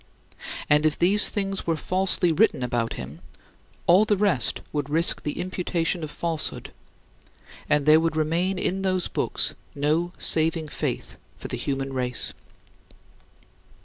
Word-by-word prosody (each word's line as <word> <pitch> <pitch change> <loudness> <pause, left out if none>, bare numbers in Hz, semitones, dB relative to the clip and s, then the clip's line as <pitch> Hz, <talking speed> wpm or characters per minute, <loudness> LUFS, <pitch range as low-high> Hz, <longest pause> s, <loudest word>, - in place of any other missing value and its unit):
And 150 +1 +3
if 155 -1 +1
these 195 +4 +6
things 195 -3 -3
were 165 -1 0
falsely 185 0 +1
written 175 - +2
about 120 -2 -1
him, - - -9 0.6
all 180 +4 +5
the 210 -1 +1
rest 185 - +1
would 145 -2 -2
risk 165 +3 +2
the 150 - -4
imputation 175 -2 -2
of 155 - -5
falsehood, 165 +1 -4 1.0
and 150 -1 +2
there 155 +1 +6
would 165 -1 -1
remain 170 +5 0
in 190 +1 -1
those 185 -2 0
books - - 0 0.2
no 155 +5 0
saving 160 -1 +3
faith - - -4 0.2
for - - -9
the - - -3
human 135 -1 -3
race. 125 -1 -3
165 Hz, 140 wpm, -24 LUFS, 150-185 Hz, 1.0 s, these